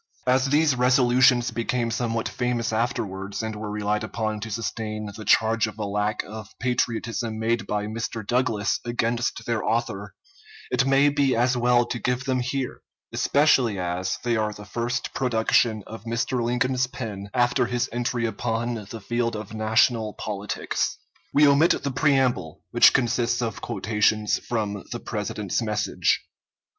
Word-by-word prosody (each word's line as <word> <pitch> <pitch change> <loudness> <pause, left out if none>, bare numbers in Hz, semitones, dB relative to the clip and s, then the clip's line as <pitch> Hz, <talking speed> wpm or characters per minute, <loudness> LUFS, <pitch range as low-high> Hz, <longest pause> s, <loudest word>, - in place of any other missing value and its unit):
As 130 +1 +3
these 150 -1 +3
resolutions 125 -1 +4
became 115 +1 -1
somewhat 115 -1 -1
famous 120 -2 -1
afterwards, 100 -3 -2
and 110 -1 -3
were 105 0 -5
relied 105 +1 -1
upon 110 -1 -3
to 110 +2 -6
sustain 110 0 -4
the 110 - -8
charge 110 0 +3
of 105 -1 -9
a 105 - -3
lack 105 +1 -1
of 110 0 -10
patriotism 115 -2 -1
made 115 +1 0
by 105 0 -1
Mr. 110 0 -4
Douglas 115 -3 +1
against 120 0 -1
their 115 -2 -1
author, 100 -4 -2 0.6
it 130 +1 +2
may 135 +2 +5
be 140 -2 +2
as 125 +2 +2
well 120 0 +3
to 120 - -4
give 125 +3 -1
them 130 -2 +1
here, 125 +1 -3 0.3
especially 135 -7 +3
as 90 +1 -2
they 120 -1 +1
are 110 -1 0
the 105 0 -11
first 120 +4 -3
production 110 -3 +2
of 110 0 -10
Mr. 115 +2 -1
Lincoln's 125 +1 +1
pen 105 -6 -6
after 120 +1 +2
his 120 -1 0
entry 120 0 -1
upon 115 0 -2
the 115 - -7
field 120 +2 -1
of 105 0 -7
national 110 0 +2
politics. 105 -1 -3 0.3
We 150 - +5
omit 140 +4 +4
the 140 - -1
preamble, 130 - +1
which - - +7
consists 120 -1 +1
of 115 -3 -3
quotations 105 +1 +1
from 105 -4 -3
the 120 - -3
President's 105 -2 -3
message. 105 -2 0
115 Hz, 150 wpm, -25 LUFS, 110-125 Hz, 0.6 s, which